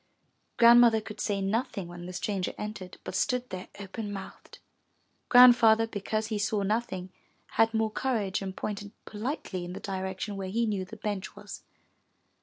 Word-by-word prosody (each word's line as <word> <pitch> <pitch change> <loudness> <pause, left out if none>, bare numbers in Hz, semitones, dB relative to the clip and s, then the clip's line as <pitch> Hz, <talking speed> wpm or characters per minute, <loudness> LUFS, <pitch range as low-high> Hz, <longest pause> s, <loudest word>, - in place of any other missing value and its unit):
Grandmother 235 -1 +7
could 215 0 -9
say 200 -2 -1
nothing 205 -1 -1
when 175 0 -9
the - - -6
stranger 190 +1 -2
entered, 210 -4 -7
but - - -6
stood 250 +6 0
there 185 0 -6
open 205 +2 -6
mouthed. 195 -1 -9 0.7
Grandfather, 235 -3 +7
because 215 0 -3
he 215 -2 -2
saw 205 0 0
nothing, 195 -3 -2 0.4
had 225 0 +3
more 220 -1 0
courage 215 -7 -1
and 190 -1 -6
pointed 205 0 -5
politely 210 - -4
in 175 +1 -6
the - - -6
direction 190 +1 -4
where 190 -1 -4
he 230 +4 +1
knew 200 -4 -1
the 220 +4 -11
bench 205 -2 -4
was. - - -9
210 Hz, 160 wpm, -29 LUFS, 190-225 Hz, 0.7 s, Grandmother